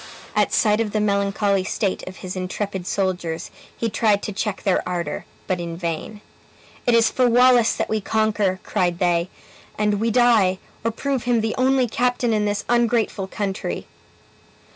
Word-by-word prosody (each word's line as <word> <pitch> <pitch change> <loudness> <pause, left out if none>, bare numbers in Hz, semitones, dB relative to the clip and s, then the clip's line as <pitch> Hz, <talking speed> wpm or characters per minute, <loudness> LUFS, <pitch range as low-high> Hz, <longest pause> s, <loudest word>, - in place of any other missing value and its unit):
At - - +2
sight 215 -1 +3
of 210 -2 -3
the 215 - +1
melancholy 200 -1 +1
state 195 0 -1
of 185 - -8
his 185 - -5
intrepid 185 0 -4
soldiers, 180 -4 -2 0.3
he 230 - -1
tried 210 -2 +1
to 210 - -4
check 210 0 -3
their 190 -2 +2
ardor, 175 -1 -3 0.2
but 185 -1 -1
in 170 -1 -5
vain. 170 +5 -4 0.7
"It 240 - +5
is 230 0 +4
for 250 -1 +3
Wallace 245 -1 +5
that - - -1
we 220 -1 -1
conquer!" 210 -3 0
cried 175 -1 0
they; 175 -1 +1 0.5
"and 210 -1 +1
we 230 +2 +1
die, 225 -6 +4 0.3
or 230 - +1
prove 265 +2 -2
him 240 -2 +2
the 220 0 -1
only 260 0 +2
captain 245 0 0
in 210 -1 +1
this 205 0 -1
ungrateful 235 -4 +1
country." 195 0 -3
210 Hz, 165 wpm, -22 LUFS, 190-230 Hz, 0.7 s, It